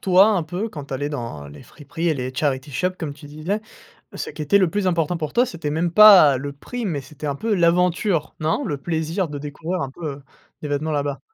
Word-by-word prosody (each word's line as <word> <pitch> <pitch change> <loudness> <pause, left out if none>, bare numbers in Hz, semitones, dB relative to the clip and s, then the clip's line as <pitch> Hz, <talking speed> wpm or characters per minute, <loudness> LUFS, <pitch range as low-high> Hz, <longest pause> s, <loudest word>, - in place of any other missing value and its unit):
toi, 190 +2 +6
un 195 -6 +2
peu, 180 +8 -4
quand 145 -7 -8
tu 135 - -5
allais 145 +2 -2
dans 115 - -6
les 70 0 -12
friperies 165 +3 -5
et 155 - +2
les 130 -1 -4
charity 140 0 -1
shop 180 +8 0
comme 150 -4 -4
tu 145 - -13
disais, 155 +8 -3 0.5
ce - - -5
qui 155 - -6
était 200 +7 +4
le 185 -4 +2
plus 205 -1 -1
important 170 -1 +1
pour 155 -3 -4
toi, 245 +2 +3
c'était 160 -6 -5
même 165 +3 0
pas 190 -10 +9
le 140 +1 -5
prix, 240 - -6
mais 155 -6 -2
c'était 150 +2 -9
un 140 - -1
peu 220 +7 -1
l'aventure, 175 -1 +1
non? 160 - 0
Le 145 -9 -2
plaisir 165 +3 -2
de 145 -1 -6
découvrir 160 +5 -4
un 135 - -4
peu, 160 +3 -8
heu, 140 - -15 0.4
des 150 - -4
vêtements 150 +2 -1
là-bas? 140 -2 -2
155 Hz, 240 wpm, -22 LUFS, 145-180 Hz, 0.5 s, pas